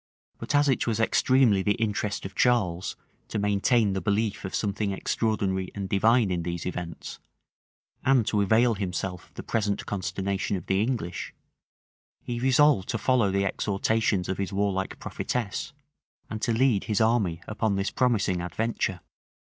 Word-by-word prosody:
But - - -2
as 145 0 +4
it 135 -3 +1
was 115 -2 0
extremely 115 -2 +3
the 105 +1 +1
interest 105 -2 -2
of 95 - -6
Charles 95 -8 +1 0.3
to - - -4
maintain 105 +1 +2
the 95 - -2
belief 105 +3 0
of 95 - -4
something 105 0 -1
extraordinary 95 -2 -1
and 100 -1 -4
divine 110 +2 +3
in 90 -1 -1
these 85 0 -4
events, 90 -2 -6 0.8
and 130 -4 +4
to 105 -1 +1
avail 115 +4 +4
himself 95 -2 -4
of - - -35
the - - -7
present 105 -3 -1
consternation 100 0 -2
of 90 - -9
the 95 +1 +1
English, 110 -7 -3 0.9
he 120 -1 -4
resolved 130 -4 +4
to 120 - 0
follow 120 -2 +2
the 100 +1 +1
exhortations 100 0 0
of 95 - -3
his 100 - -2
warlike 95 -1 -1
prophetess, 115 -5 -3 0.6
and 110 -1 -4
to 115 - +1
lead 115 -2 +2
his 105 -2 0
army 110 -7 +2
upon 110 -1 0
this 100 +1 -1
promising 105 -8 +1
adventure. 95 0 -2
105 Hz, 155 wpm, -27 LUFS, 95-115 Hz, 0.9 s, as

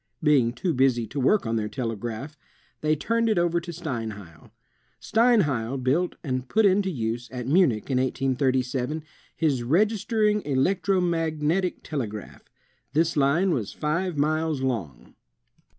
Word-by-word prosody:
Being 135 -6 +4
too 165 +8 -1
busy 130 -3 +2
to 130 +7 -5
work 135 +9 +3
on 115 0 0
their 105 -1 -2
telegraph, 120 +4 -4 0.5
they 155 0 +2
turned 230 +8 0
it 215 - +1
over 170 0 +2
to 170 +1 -7
Steinheil. 115 - -6 0.5
Steinheil 150 - +2
built 135 +8 0
and 130 -3 -3
put 220 0 +3
into 195 0 +3
use, 120 -5 -3
at 125 -2 -5
Munich, 140 - +2
in 125 - +2
1837, 130 +2 0 0.3
his 145 -6 +1
Registering 210 - +2
Electro 185 +7 +1
Magnetic 165 +1 0
Telegraph. 110 - -6 0.4
The 165 +2 +2
line 155 +7 +3
was 115 - -2
five 170 +2 -2
miles 155 0 0
long. 110 - -4
145 Hz, 135 wpm, -25 LUFS, 125-175 Hz, 0.5 s, Being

